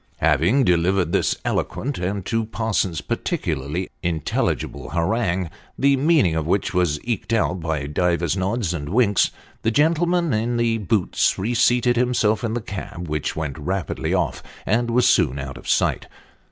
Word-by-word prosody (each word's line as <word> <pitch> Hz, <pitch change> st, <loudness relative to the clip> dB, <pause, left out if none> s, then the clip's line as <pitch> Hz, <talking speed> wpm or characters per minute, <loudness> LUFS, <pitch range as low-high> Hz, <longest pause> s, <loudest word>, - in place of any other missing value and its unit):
Having 115 Hz, -, +3 dB
delivered 90 Hz, -2 st, +2 dB
this -, -, +1 dB
eloquent, 140 Hz, 0 st, -2 dB
and, 95 Hz, +1 st, -3 dB
to 115 Hz, 0 st, 0 dB
Parsons, 105 Hz, -8 st, -1 dB
particularly 90 Hz, -, -2 dB
in 85 Hz, -2 st, -1 dB
telligible 70 Hz, -1 st, -2 dB
harangue, 90 Hz, -1 st, 0 dB, 0.3 s
the 140 Hz, 0 st, +4 dB
meaning 140 Hz, -, +3 dB
of 80 Hz, -1 st, -2 dB
which 95 Hz, +1 st, 0 dB
was 85 Hz, -5 st, +1 dB
eked 115 Hz, -2 st, -3 dB
out 105 Hz, -5 st, +1 dB
by 80 Hz, -4 st, -2 dB
divers 85 Hz, +2 st, 0 dB
nods 95 Hz, 0 st, -1 dB
and 75 Hz, -3 st, -4 dB
winks, 105 Hz, -2 st, +3 dB, 0.3 s
the 110 Hz, -, +1 dB
gentleman 165 Hz, +4 st, +2 dB
in 115 Hz, +3 st, 0 dB
the 115 Hz, -1 st, +1 dB
boots 105 Hz, -2 st, +1 dB
reseated 120 Hz, +3 st, +2 dB
himself 120 Hz, -3 st, +1 dB
in 115 Hz, -1 st, -1 dB
the 120 Hz, -, -2 dB
cab, 95 Hz, -4 st, -7 dB
which 75 Hz, -1 st, -2 dB
went 75 Hz, -2 st, -4 dB
rapidly 95 Hz, +3 st, -2 dB
off, -, -, 0 dB, 0.2 s
and 120 Hz, +3 st, +1 dB
was 125 Hz, +1 st, +3 dB
soon 65 Hz, -, +3 dB
out 70 Hz, 0 st, -6 dB
of 65 Hz, -, -9 dB
sight. -, -, +1 dB
100 Hz, 155 wpm, -22 LUFS, 85-120 Hz, 0.3 s, the